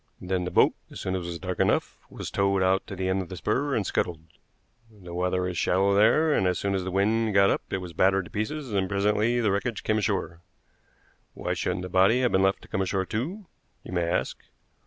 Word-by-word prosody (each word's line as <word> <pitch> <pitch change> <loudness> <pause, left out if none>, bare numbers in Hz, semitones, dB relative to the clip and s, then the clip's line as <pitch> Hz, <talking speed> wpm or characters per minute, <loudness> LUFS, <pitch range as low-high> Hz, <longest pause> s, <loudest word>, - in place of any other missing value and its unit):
"Then 90 0 -2
the - - -2
boat, - - +4 0.2
as - - -9
soon 95 - -3
as 95 - -2
it - - -7
was 85 -1 -4
dark 95 0 -5
enough, - - +1
was - - -7
towed 100 -1 +1
out 95 +1 +1
to 100 - -6
the 95 0 -2
end 95 +1 +1
of 90 - -8
the 95 - -7
spur 130 - 0
and 105 - 0
scuttled. 85 -3 -1 0.7
The 95 -6 -12
water 90 +1 0
is 90 -3 -3
shallow 95 +2 +2
there, 150 +10 +4
and 95 - +2
as 90 -1 +1
soon 100 0 -1
as 95 -1 -1
the 95 - -3
wind 105 +3 +1
got 100 0 +5
up - - 0
it - - 0
was 90 -2 -7
battered 95 +2 +2
to - - -13
pieces 125 +4 -3
and 95 -2 0
presently 105 +4 +1
the 105 -3 +2
wreckage 105 +3 -2
came 110 0 +1
ashore. 95 -5 -2 0.9
Why - - -2
shouldn't 90 0 -2
the - - -4
body 95 +7 +4
have 125 - +2
been 95 - +3
left 95 0 +1
to - - -14
come 95 - -2
ashore 95 0 -1
too? 160 - -4 0.4
you - - -9
may 85 -2 0
ask. 85 - -1
95 Hz, 240 wpm, -26 LUFS, 90-105 Hz, 0.9 s, got